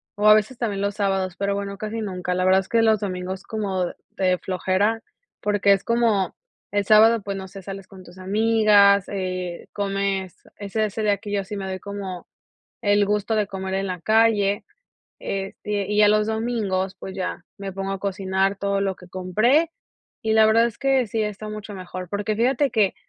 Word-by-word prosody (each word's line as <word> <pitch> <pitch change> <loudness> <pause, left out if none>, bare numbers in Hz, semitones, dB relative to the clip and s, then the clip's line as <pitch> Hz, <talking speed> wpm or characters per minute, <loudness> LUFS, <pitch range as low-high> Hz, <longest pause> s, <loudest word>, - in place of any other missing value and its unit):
o 210 +1 +2
a - - +10
veces 215 +4 +1
también 205 -5 -2
los 200 0 -1
sábados, 195 -3 0
pero 200 0 0
bueno 200 0 -4
casi 215 +2 -4
nunca. 180 -3 -3
La 185 - 0
verdad 190 +1 +5
es 190 - -14
que 230 -1 +3
los 220 -1 +4
domingos 185 -1 -4
como 195 -5 -2 0.2
de 185 -1 +1
flojera 190 +4 0 0.4
porque 205 -1 +3
es 195 - -1
como 230 -5 +1 0.4
El 205 -1 0
sábado, 220 +2 +6
pues 200 -1 -4
no 190 0 -6
sé, 195 +1 -10
sales 195 0 -8
con 190 -2 -13
tus 175 +1 -15
amigas, 205 0 +4
eh, 185 -3 -4
comes 195 -2 -2 0.2
ese 210 +2 -1
ese 215 +1 -3
día 210 -1 +3
aquí, 200 +1 -6
yo 200 -1 +1
así 195 +2 -7
me 195 -1 -4
doy 190 0 -4
como 195 -3 -6 0.6
el 205 -1 +4
gusto 210 +1 0
de 210 -2 +1
comer 190 -1 -5
en 195 0 -1
la 180 -2 -4
calle, 215 -1 +3 0.6
este 195 +1 -3
y 210 0 0
ya 210 -1 +7
los 210 0 +3
domingos, 215 -4 -1
pues 190 0 -8
ya 180 -1 -4
me 195 -1 -5
pongo 195 +1 -3
a 195 - -5
cocinar 195 0 0
todo 200 0 -1
lo 195 -1 -1
que 180 - -14
compré 215 - +2 0.5
y 220 0 +2
la 220 0 +6
verdad 225 +2 +5
es 235 - -6
que 270 -2 +2
sí 225 +1 -2
está 210 0 -4
mucho 210 -1 -7
mejor, 185 -1 -7
porque 205 +2 -2
fíjate 260 +4 +2
que 215 -5 +2
200 Hz, 200 wpm, -23 LUFS, 190-215 Hz, 0.6 s, a